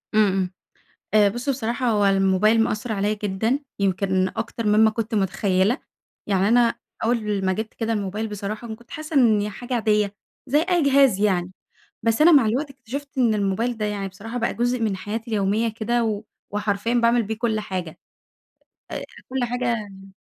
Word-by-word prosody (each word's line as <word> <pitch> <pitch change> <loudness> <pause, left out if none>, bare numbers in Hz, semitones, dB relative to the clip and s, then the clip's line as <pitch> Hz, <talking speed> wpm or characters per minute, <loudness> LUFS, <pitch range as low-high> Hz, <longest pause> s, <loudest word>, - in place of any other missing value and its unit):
إمم، 215 -1 +5
إمم. 185 -1 -1 0.6
آآ 210 -1 +6
بُص 240 +6 -5
بصراحة 250 -1 -1
هو 210 -2 +2
الموبايل 195 +3 +3
مأثر 220 +1 -2
عليَّ 205 +1 0
جدًا، 215 +6 0 0.2
يمكن 190 -1 +1
أكتر 225 0 -3
مما 215 +1 +5
كنت 220 0 -3
متخيّلة؛ 195 +2 +1 0.5
يعني 195 -1 +2
أنا 235 0 +4 0.3
أوّل 210 -4 0
ما 190 - +2
جبت 215 +3 -4
كده 225 0 -2
الموبايل 210 +1 -2
بصراحة 215 +2 -5
كنت 235 +1 -19
حاسّة 310 0 -7
إن 225 -6 +5
هي 210 +1 -2
حاجة 245 +5 -5
عاديّة 210 -3 +1 0.3
زي 290 +3 +3
أي 355 -1 +1
جهاز 275 -7 +4
يعني، 185 -3 +1 0.5
بس 230 +3 +2
أنا 335 +3 +8
مع 280 -7 +6
الوقت 265 +7 0
اكتشفت 275 +2 -8
إن 235 -4 +3
الموبايل 215 +4 0
ده 215 - -1
يعني 205 -2 -2
بصراحة 210 +5 -7
بقى 235 - 0
جزء 245 +1 0
من 215 -3 0
حياتي 225 +4 -5
اليوميّة 210 +2 +1
كده 230 +2 -1
و 215 -2 -2 0.3
وحرفيًا 205 +2 -1
باعمل 235 0 +3
بيه 220 +1 -4
كل 225 -2 0
حاجة. 185 -6 -5 0.9
آآ - - -4 0.3
كل 260 -1 -1
حاجة 245 +1 -2
يعني 205 -5 -4
220 Hz, 175 wpm, -23 LUFS, 200-240 Hz, 0.9 s, أنا